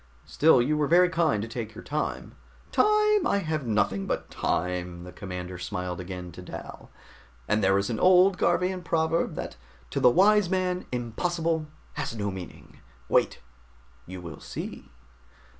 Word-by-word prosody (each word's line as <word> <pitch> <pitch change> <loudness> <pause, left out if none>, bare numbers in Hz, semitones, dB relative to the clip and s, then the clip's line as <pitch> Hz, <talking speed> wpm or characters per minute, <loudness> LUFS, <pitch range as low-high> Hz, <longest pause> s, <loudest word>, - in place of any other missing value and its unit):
Still, 145 -5 +4
you 150 +4 +1
were 150 -1 +1
very 180 +3 +5
kind 160 - +1
to - - -5
take 110 -2 -6
your 115 - -9
time 150 +2 -3 0.2
" - - -28
"Time? 425 -2 +3
I - - +2
have 155 -5 -2
nothing 100 -3 0
but - - -3
time." 90 0 -2
The 90 - -9
commander 90 -1 -7
smiled 90 -1 -4
again 90 -1 -7
at 90 - -9
Dal. - - -9 0.6
"And 105 0 +1
there 95 +1 +4
is 100 +3 -1
an 110 - -2
old 185 0 +5
Garvian 185 0 +1
proverb 165 -1 0
that - - -6 0.3
to - - -1
the 125 - +6
wise 200 +5 +4
man 185 -1 -1
'impossible' 160 +7 -1 0.3
has 150 -4 -4
no 100 -2 -2
meaning. 95 -2 -10 0.3
Wait, - - +2 0.7
you 90 0 -7
will 85 -2 -8
see!" - - -7
125 Hz, 160 wpm, -27 LUFS, -, 0.7 s, the